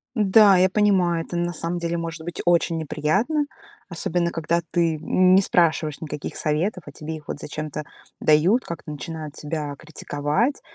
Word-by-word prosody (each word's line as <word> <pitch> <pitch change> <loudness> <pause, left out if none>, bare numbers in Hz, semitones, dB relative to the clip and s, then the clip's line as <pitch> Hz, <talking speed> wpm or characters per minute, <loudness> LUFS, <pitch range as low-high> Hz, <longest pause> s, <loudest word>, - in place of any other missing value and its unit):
Да, 205 -2 +6
я 185 +1 +4
понимаю, 185 -5 +2
это, 175 - -6
на 175 0 -1
самом 170 +1 -3
деле, 170 0 -2
может 165 -1 -5
быть 175 - -6
очень 170 -1 +2
неприятно, 190 - 0 0.4
особенно 170 0 -1
когда 165 +1 0
ты 165 -2 +1
не 185 +3 +4
спрашиваешь 160 -5 +1
никаких 150 -1 -6
советов, 170 +5 -1
а - - -9
тебе 160 +1 -6
их 150 -2 -12
вот - - -5
зачем-то 150 0 -5 0.4
дают, 170 +11 +4
как-то 170 -2 -7
начинают 155 0 -6
тебя 150 -1 -4
критиковать. 155 - -2
170 Hz, 155 wpm, -23 LUFS, 155-185 Hz, 0.4 s, Да